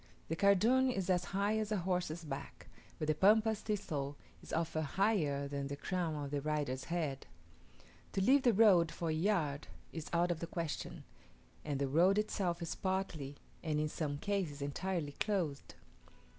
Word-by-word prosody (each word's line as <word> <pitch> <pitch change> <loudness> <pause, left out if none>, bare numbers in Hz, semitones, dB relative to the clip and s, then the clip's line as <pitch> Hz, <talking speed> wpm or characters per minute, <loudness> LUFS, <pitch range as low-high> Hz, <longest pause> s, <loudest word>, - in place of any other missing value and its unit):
The 165 - 0
cardoon 220 +8 +4
is 195 -6 0
as 180 -1 +2
high 200 +4 0
as 215 -1 -2
a 210 - +2
horse's 175 -2 -1
back, 135 -3 -7 0.3
but 155 - -3
the 155 - +4
Pampas 215 +5 +4
thistle 145 -10 -3 0.2
is - - -11
often 160 -1 0
higher 150 -5 +1
than 140 0 -3
the 140 - -4
crown 170 +1 -2
of 145 -2 -4
the 145 -1 -1
rider's 145 -3 -1
head. 155 -6 -2 0.9
To 195 - +1
leave 270 +8 +5
the 250 -2 +5
road 190 -7 +5
for 165 +1 -3
a - - +1
yard 155 -5 0 0.3
is 160 -2 -5
out 175 +1 +2
of 170 - -2
the 170 - -4
question; 165 -3 -4 0.6
and 145 -2 -2
the 140 - +1
road 175 +8 +4
itself 185 -5 0
is 165 - -3
partly, 185 -7 -2 0.3
and 155 -2 0
in 155 0 0
some 150 -2 -2
cases 185 -5 -2
entirely 150 +2 -2
closed. 170 -6 -2
170 Hz, 170 wpm, -35 LUFS, 150-195 Hz, 0.9 s, leave